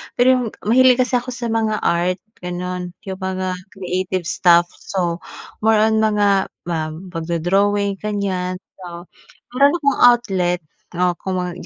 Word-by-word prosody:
Pero 245 - +3
'yung 255 -1 +2 0.2
mahilig 255 +3 +5
kasi 250 0 0
ako 250 0 -7
sa 235 -2 -3
mga 220 -1 0
art, 175 +2 +1 0.2
gano'n 180 0 -5
'yung 190 -2 -6
mga 185 -1 -3 0.2
creative 185 -1 -2
stuff 175 -1 +4
so 175 -3 -2 0.4
more 220 +1 +3
on 220 +1 +3
mga 205 -3 +2 0.2
ma 160 -2 -3 0.2
magdo-drawing, 195 +4 0
ganyan, 195 -3 -2 0.2
so 175 -2 -8 0.5
meron 280 +4 +4
akong 280 -1 +2
outlet, 190 -8 +3 0.3
oh, 180 +1 +2
kung 190 -1 -3
ma 180 -1 -2
190 Hz, 140 wpm, -20 LUFS, 180-220 Hz, 0.5 s, mahilig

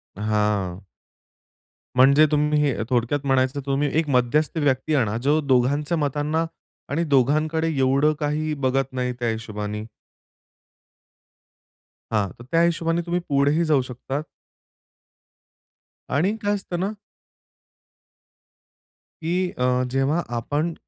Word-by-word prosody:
हां. 105 -3 -1 1.1
म्हणजे 140 +4 +6
तुम्ही 150 0 +2
हे 140 -6 0
थोडक्यात 125 +3 +1
म्हणायचं 135 +1 +1
तुम्ही 140 +1 0
एक 160 -2 -1
मध्यस्थ 140 +5 +1
व्यक्ती 145 0 +1
आणा. 115 -6 +1
जो 145 +6 +2
दोघांच्या 145 +4 +1
मतांना 150 +2 0 0.4
आणि 160 +4 0
दोघांकडे 155 +3 +2
एवढं 135 +3 +3
काही 155 +1 -1
बघत 135 0 0
नाही 125 -1 -1
त्या 120 -1 0
हिशोबाने. 105 -1 -4 2.3
हां. 105 -3 +1 0.2
त्या 165 - +4
हिशोबाने 165 0 +1
तुम्ही 175 0 0
पुढेही 145 +4 +2
जाऊ 150 -4 +3
शकता. 135 +3 -4 1.9
आणि 180 +10 +1
काय 205 0 +1
असतं 185 -3 -5
ना. 195 +3 -1 2.3
की 180 +3 0
अ, 125 0 +1
जेव्हा 135 +5 +1 0.2
आपण 150 +8 -1
140 Hz, 105 wpm, -23 LUFS, 125-155 Hz, 2.3 s, म्हणजे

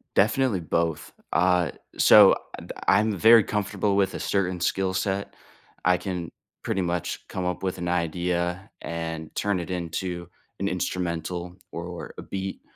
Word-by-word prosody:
Definitely 105 0 +3
both. 85 -1 -1 0.2
Uh, 90 -2 +3 0.3
so, - - +8 0.2
I - - -8
th - - -8 0.2
I'm 105 +1 +3
very 115 +3 +7
comfortable 105 0 -1
with 100 -1 +2
a - - -4
certain 95 -2 0
skill 95 +1 +1
set. 95 +1 -2 0.5
I 90 +1 +5
can 90 -2 -4 0.3
pretty 95 - 0
much 85 -1 -3
come 95 - -4
up 90 0 -2
with 95 -1 -1
an 85 -1 -4
idea 90 +2 -1
and 80 -1 -5
turn 100 -2 0
it 85 - -6
into 85 0 -3 0.3
an - - 0
instrumental 90 0 -3 0.2
or 85 0 -6
a - - -6
beat 95 0 -5
90 Hz, 150 wpm, -26 LUFS, 85-95 Hz, 0.5 s, so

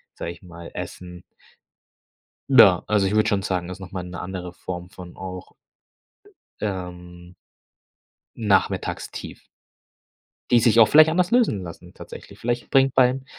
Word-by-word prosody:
sage 85 - -5
ich 85 - -13
mal, 85 -2 -11
Essen. 90 -1 -8 1.3
Na, 100 -9 +7
also 105 -2 +2
ich 100 - -1
würde 110 - +3
schon 100 -1 +1
sagen, 90 -2 -3
ist 90 0 -8
noch 95 -1 -10
mal 90 -2 -4
'ne 90 -1 -8
andere 90 -1 -6
Form 90 0 -7
von 90 -2 -12
auch 95 -1 -8 1.1
ähm 90 -3 -6 1.0
Nachmittagstief. 105 -4 -2 1.1
Die 120 - +6
sich 115 0 +4
auch 110 - +8
vielleicht 155 +1 +7
anders 180 +2 +1
lösen 230 - +2
lassen 90 +1 -11
tatsächlich. - - -12
Vielleicht 120 +1 -3
bringt 135 -1 +3
beim 130 +1 +3
95 Hz, 140 wpm, -23 LUFS, 90-115 Hz, 1.3 s, auch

